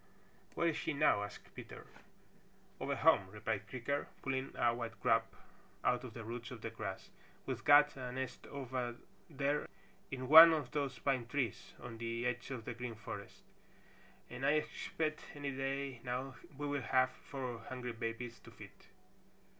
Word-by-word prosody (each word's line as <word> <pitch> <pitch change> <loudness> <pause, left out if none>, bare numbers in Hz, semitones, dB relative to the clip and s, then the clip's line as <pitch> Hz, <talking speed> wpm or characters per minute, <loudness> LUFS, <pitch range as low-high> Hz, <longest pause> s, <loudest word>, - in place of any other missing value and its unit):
"Where 170 - +3
is 160 - -2
she 160 - -1
now?" 140 -8 +4
asked 105 0 -8
Peter. - - -9 0.9
"Over - - -1
home," 95 - +5
replied 105 0 -3
Creaker, 130 +3 -2 0.2
pulling 135 0 -1
a 120 -1 +3
white 115 -1 -5
grub - - +3 0.6
out 125 0 +2
of 125 -4 -8
the 115 - -6
roots 115 +1 -5
of 125 -5 -8
the 115 - -4
grass. 105 -4 -6 0.3
"We've - - -3
got 145 0 +7
a 125 -2 -5
nest 130 +1 -5
over 125 -3 -3 0.3
there 145 0 0 0.4
in 130 -1 -4
one 160 +3 +12
of 150 -6 -2
those 140 -3 -1
pine 125 -1 0
trees 125 -4 -2
on 115 -2 -8
the 115 +1 -2
edge 120 +1 -1
of 125 -5 -5
the 125 - -3
Green 120 -1 -5
Forest 110 -2 -8 0.8
and 125 +2 -7
I 145 - +5
expect 155 0 -1
any 145 -1 -3
day 135 -2 -2
now 125 +2 -3 0.2
we 145 - -3
will 145 -1 -1
have 130 0 +3
four 130 -5 -6
hungry 125 -2 -4
babies 115 +1 -4
to - - -14
feed. - - -12
125 Hz, 165 wpm, -36 LUFS, 115-140 Hz, 0.9 s, one